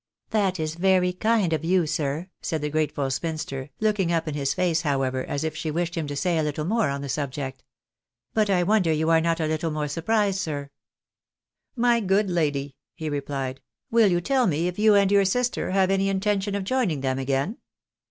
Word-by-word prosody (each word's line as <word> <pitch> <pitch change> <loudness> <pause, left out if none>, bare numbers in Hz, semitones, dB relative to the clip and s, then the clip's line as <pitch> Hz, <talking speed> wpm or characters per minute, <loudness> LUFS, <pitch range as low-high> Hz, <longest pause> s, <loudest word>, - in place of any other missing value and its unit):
" - - -68
That 195 -4 +1
is 155 0 -2
very 180 +1 +2
kind 210 -2 +1
of 155 - -1
you." 180 0 +2
said 150 +3 -2 0.3
the 150 0 -3
grateful 145 -3 -1
spinster; 140 -2 -4
looking 210 -5 +1
up 165 -1 0
in 155 - -2
his 140 -2 -1
face, 175 -3 +1
however, 135 -4 0
as 140 - -3
if 160 0 -2
she 160 0 -3
wished 170 +2 -1
him 165 -4 -3
to 145 - -4
say 170 +2 +1
a - - +2
little 150 0 -2
more 220 -1 +1
on 140 0 -3
the - - -4
subject. 135 -1 -4 0.3
" - - -61
But 215 -2 +2
I 180 -2 +3
wonder 190 -3 +3
you 160 +1 +1
are 165 0 +5
not 165 0 0
a 160 - 0
little 155 +1 -1
more 150 -1 -2
surprised, 195 +6 0
sir." 145 -6 -4 0.5
" - - -60 0.2
My 235 - +3
good 195 -1 +1
lady," 145 -5 -1 0.2
he 155 -1 -4
replied, 135 -2 -3 0.2
" - - -52
will 230 -2 +5
you 175 -2 +2
tell 260 +4 +2
me 165 0 +1
if 180 +2 -4
you 215 -1 +5
and 200 -1 +4
your 200 -1 +5
sister 245 +6 0
have 190 0 +2
any 195 0 +2
intention 200 +1 0
of 200 - -2
joining 195 - 0
them 130 -1 -1
again 135 - -1
165 Hz, 215 wpm, -25 LUFS, 145-195 Hz, 0.5 s, are